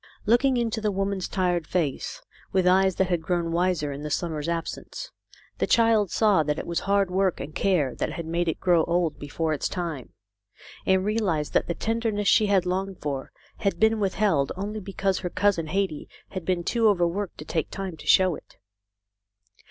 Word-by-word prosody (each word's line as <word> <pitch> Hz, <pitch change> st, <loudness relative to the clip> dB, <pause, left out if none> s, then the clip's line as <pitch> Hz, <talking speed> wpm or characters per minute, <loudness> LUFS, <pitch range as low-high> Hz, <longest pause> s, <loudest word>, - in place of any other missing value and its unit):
Looking 245 Hz, +4 st, +3 dB
into 230 Hz, -2 st, -1 dB
the 215 Hz, -, +1 dB
woman's 195 Hz, -1 st, -1 dB
tired 175 Hz, -4 st, 0 dB
face 160 Hz, -7 st, -2 dB, 0.3 s
with 190 Hz, -1 st, +2 dB
eyes 190 Hz, 0 st, +4 dB
that 190 Hz, -1 st, +1 dB
had 175 Hz, -2 st, +1 dB
grown 170 Hz, 0 st, -1 dB
wiser 170 Hz, -4 st, 0 dB
in 140 Hz, +1 st, -6 dB
the 150 Hz, -, -4 dB
summer's 160 Hz, -1 st, -2 dB
absence, 170 Hz, -, -5 dB, 0.5 s
the -, -, +1 dB
child 225 Hz, -4 st, +4 dB
saw 210 Hz, -5 st, +3 dB
that 150 Hz, 0 st, -1 dB
it -, -, -4 dB
was 170 Hz, 0 st, -1 dB
hard 200 Hz, -1 st, +1 dB
work 190 Hz, -1 st, +1 dB
and 145 Hz, +3 st, -6 dB
care 155 Hz, -11 st, +1 dB
that -, -, -3 dB
had 170 Hz, -, -5 dB
made 170 Hz, +2 st, -1 dB
it 165 Hz, -, -1 dB
grow 175 Hz, -3 st, +3 dB
old 170 Hz, -3 st, 0 dB
before 155 Hz, +2 st, -2 dB
its 145 Hz, -, -2 dB
time, 165 Hz, -8 st, -5 dB, 0.7 s
and 190 Hz, 0 st, +3 dB
realised 195 Hz, -9 st, 0 dB
that -, -, +2 dB
the 170 Hz, -, -2 dB
tenderness 225 Hz, -2 st, -1 dB
she 215 Hz, -, +5 dB
had 195 Hz, -3 st, +3 dB
longed 190 Hz, +1 st, -2 dB
for 140 Hz, -2 st, -4 dB, 0.3 s
had 195 Hz, -4 st, -1 dB
been 220 Hz, 0 st, +3 dB
withheld 190 Hz, -8 st, +1 dB
only 205 Hz, +3 st, -4 dB
because 195 Hz, -1 st, -1 dB
her 180 Hz, -, -3 dB
cousin 185 Hz, -4 st, +1 dB
Hetty 185 Hz, -2 st, -2 dB, 0.2 s
had 185 Hz, -3 st, -6 dB
been 180 Hz, -1 st, 0 dB
too 230 Hz, +4 st, +2 dB
overworked 180 Hz, 0 st, 0 dB
to 150 Hz, -, -8 dB
take 160 Hz, -1 st, -2 dB
time 190 Hz, -3 st, -5 dB
to -, -, -12 dB
show 185 Hz, -2 st, +5 dB
it. -, -, -12 dB
185 Hz, 190 wpm, -26 LUFS, 165-200 Hz, 0.7 s, she